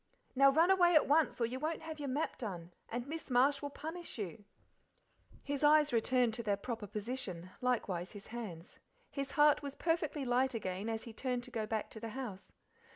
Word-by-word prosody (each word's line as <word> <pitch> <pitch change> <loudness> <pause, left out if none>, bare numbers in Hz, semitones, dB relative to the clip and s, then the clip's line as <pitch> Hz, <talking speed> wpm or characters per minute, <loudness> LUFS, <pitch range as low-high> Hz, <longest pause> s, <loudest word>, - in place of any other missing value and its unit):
Now 275 +1 +7
run 325 +6 +5
away 350 -2 +5
at 305 - +6
once, 305 0 +3
or 235 - +3
you 250 +3 -4
won't 315 +2 -2
have 315 -1 -6
your 285 -2 -3
map 290 +5 -2
done, 180 -7 -6 0.2
and 240 +1 -3
miss 315 +2 -6
Marsh 270 +3 +4
will 285 - -3
punish 325 +3 -6
you." 200 -1 -5 1.0
His 285 0 -3
eyes 300 -1 +5
returned 240 0 +3
to 235 - -3
their 205 -3 0
proper 225 0 -5
position, 200 -5 -4
likewise 200 -8 -1
his 205 -1 -10
hands. 195 -7 -7 0.3
His 275 -1 -4
heart 295 0 +5
was 280 -1 -6
perfectly 315 -4 0
light 255 +1 +2
again 195 0 -3
as 225 -1 -2
he 230 - -9
turned 250 +1 -2
to 255 - -10
go 220 -3 -2
back 220 -1 -2
to 220 - -8
the 225 0 -5
house. 200 -8 -7
250 Hz, 200 wpm, -34 LUFS, 215-290 Hz, 1.0 s, Now